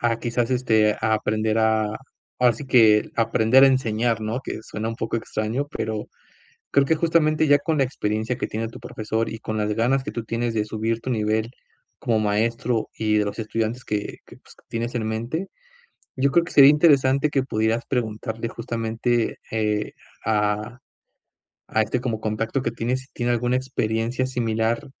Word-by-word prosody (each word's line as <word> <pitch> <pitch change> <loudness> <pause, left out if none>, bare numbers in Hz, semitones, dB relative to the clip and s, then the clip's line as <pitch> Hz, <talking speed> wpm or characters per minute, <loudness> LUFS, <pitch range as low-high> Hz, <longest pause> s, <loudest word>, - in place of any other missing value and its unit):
a 115 -1 +1
quizás, 120 0 -1
este, 110 -4 +3
a 110 0 +2
aprender 110 +1 0
a 110 -1 +2 0.5
ahora 125 -1 +5
sí 125 +6 -8
que 110 -4 +5
aprender 115 +3 +4
a - - +9
enseñar, 115 -3 +1
¿no?, 110 +4 -2
que - - -5
suena 110 0 -4
un 115 - -5
poco 115 - -2
extraño. 110 +4 -2
Pero, 110 -1 -3 0.7
creo 140 - +5
que 160 - +2
justamente 155 -1 +2
ya 145 0 +6
con 155 +2 -1
la 135 - +4
experiencia 110 -1 -2
que - - -3
tiene 110 +1 -3
tu - - -11
profesor, 110 +1 -3
y 110 - -6
con 110 -1 -4
las 105 0 0
ganas 130 +4 +1
que - - -5
tú 115 -2 -5
tienes 115 +1 -2
de 105 -1 +1
subir 110 +2 -2
tu 130 - -4
nivel 110 0 0 0.5
como 115 -2 +1
maestro, 110 +2 0
y 105 -1 +2
de 105 - +2
los 100 +1 -5
estudiantes 115 +2 -2
que 105 -1 -3
que - - -14
pues, - - -19
que - - -24
tienes 115 +2 -3
en 110 -2 -2
mente, 120 - -3 0.7
yo 135 +1 +2
creo 170 +3 +3
que - - -9
sería 140 0 +9
interesante 145 -2 +4
que 135 - +1
pudieras 115 -2 0
preguntarle 115 -1 -3
justamente, 115 0 -1
eh, 105 -1 -1 0.3
a 105 +1 0 0.9
a 110 - +1
este 110 +4 -1
como 115 -3 -2
contacto 110 +4 -2
que - - -1
tienes, 120 +3 -2
si 130 - -15
tiene 120 0 -1
alguna 120 +2 +1
experiencia 120 -1 -1
similar, 115 -2 -1
115 Hz, 180 wpm, -23 LUFS, 110-125 Hz, 0.9 s, a